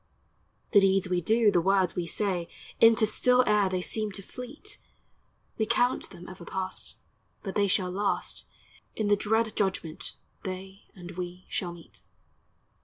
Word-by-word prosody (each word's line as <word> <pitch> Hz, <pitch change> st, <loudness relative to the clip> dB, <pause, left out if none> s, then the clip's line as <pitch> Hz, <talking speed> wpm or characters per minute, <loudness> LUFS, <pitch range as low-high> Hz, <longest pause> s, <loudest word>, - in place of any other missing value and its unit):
The 205 Hz, -, +8 dB
deeds 195 Hz, -1 st, +3 dB
we 180 Hz, -1 st, +1 dB
do, 220 Hz, +3 st, +4 dB
the 175 Hz, -3 st, +3 dB
words 190 Hz, -1 st, +2 dB
we 175 Hz, -1 st, -2 dB
say, 180 Hz, -2 st, -1 dB, 0.3 s
Into 225 Hz, 0 st, +7 dB
still 250 Hz, +4 st, +4 dB
air 210 Hz, -3 st, +3 dB
they 185 Hz, -1 st, -1 dB
seem 215 Hz, +1 st, -2 dB
to 195 Hz, -, -8 dB
fleet, 295 Hz, -, -8 dB, 0.8 s
We 220 Hz, -, +2 dB
count 245 Hz, +2 st, +2 dB
them 180 Hz, -1 st, -11 dB
ever 185 Hz, -1 st, -9 dB
past; 190 Hz, +2 st, -4 dB, 0.4 s
But 195 Hz, -, -4 dB
they 205 Hz, -1 st, +3 dB
shall 185 Hz, -1 st, +2 dB
last, 200 Hz, +2 st, -2 dB, 0.5 s
In 215 Hz, -2 st, 0 dB
the 205 Hz, -, +6 dB
dread 220 Hz, +2 st, +1 dB
judgment 185 Hz, -5 st, -2 dB, 0.3 s
they 190 Hz, +1 st, -7 dB
And 180 Hz, -1 st, -9 dB
we 180 Hz, 0 st, -6 dB
shall 175 Hz, -2 st, -2 dB
meet. 170 Hz, -1 st, -13 dB
195 Hz, 155 wpm, -28 LUFS, 180-215 Hz, 0.8 s, The